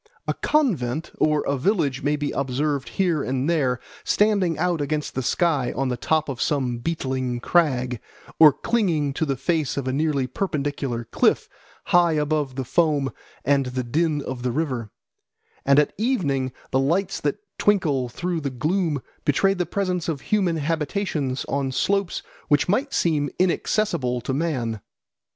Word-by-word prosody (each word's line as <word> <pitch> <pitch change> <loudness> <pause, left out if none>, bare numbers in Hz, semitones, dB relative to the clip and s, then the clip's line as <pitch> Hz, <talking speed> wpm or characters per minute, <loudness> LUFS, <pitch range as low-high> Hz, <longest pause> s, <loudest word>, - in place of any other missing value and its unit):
A - - +1
convent 165 - 0
or 155 -1 +3
a 140 - 0
village 150 -6 +1
may 145 +1 +1
be 145 -1 -2
observed 140 +1 -1
here 175 -6 +2
and 130 +1 -1
there 135 -7 +1 0.2
standing 200 -6 +2
out 175 -1 0
against 150 +1 -2
the 130 - -1
sky 145 -3 +1
on 135 0 0
the 125 - 0
top 155 +5 0
of 135 -4 -4
some 130 -5 0
beetling 130 -4 -2
crag, 130 -6 +1 0.4
or 155 -2 +10
clinging 160 - 0
to 160 - -1
the 135 - 0
face 155 +2 -1
of 135 -2 -2
a 130 - 0
nearly 145 -2 +1
perpendicular 140 -5 -2
cliff - - +1 0.4
high 175 -2 +4
above 150 -3 0
the 130 -1 -3
foam 150 -3 +2 0.3
and 140 -1 +3
the 125 0 -2
din 150 +4 0
of 130 -2 -5
the 125 0 -1
river; 130 -6 -2 0.8
and 140 0 +6
at 150 - +3
evening 145 - 0 0.2
the 130 - +2
lights 170 +8 0
that 145 +6 0 0.2
twinkle 150 -11 +2
through 175 +5 -3
the 140 - -2
gloom 150 - -1 0.2
betray 195 +7 +3
the 180 -2 -2
presence 180 -4 -1
of 145 -5 -2
human 190 -3 +1
habitations 150 -2 -1
on 140 -1 -1
slopes 195 +6 0 0.2
which 145 -1 +3
might 260 +10 +1
seem 150 - +1
inaccessible 175 - +1
to 130 +3 -3
man. 130 -8 -1
145 Hz, 160 wpm, -24 LUFS, 130-170 Hz, 0.8 s, or